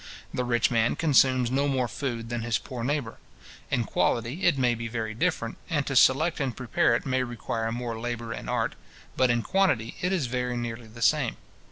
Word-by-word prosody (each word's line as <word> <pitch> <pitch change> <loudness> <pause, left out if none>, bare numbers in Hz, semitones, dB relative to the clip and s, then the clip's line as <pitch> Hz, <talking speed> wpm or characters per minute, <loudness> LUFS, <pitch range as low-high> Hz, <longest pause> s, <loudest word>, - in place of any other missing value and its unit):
The 125 - -1
rich 120 -1 +2
man 115 0 +2
consumes 130 -5 +3
no 140 +2 +2
more 130 -3 +1
food 115 -1 -4
than 120 -1 -2
his 115 -1 0
poor 125 -3 -7
neighbour. 135 -3 -2 0.5
In - - +1
quality 120 +10 0
it 170 -5 +4
may 125 -2 +3
be 115 0 -4
very 110 -1 -3
different, 115 +1 -1
and 145 -5 0
to 140 - -3
select 155 +7 +4
and 135 -5 -2
prepare 120 -1 +2
it - - -2
may 130 -1 +1
require 115 -2 -3
more 120 -1 -4
labour 120 -1 -4
and - - -7
art; - - 0 0.4
but 130 -1 +3
in 120 -1 +2
quantity 185 - +1
it 180 - 0
is 180 -8 +1
very 125 0 -2
nearly 120 -1 -5
the 115 +2 -6
same. 135 -3 +2
120 Hz, 200 wpm, -27 LUFS, 115-135 Hz, 0.5 s, it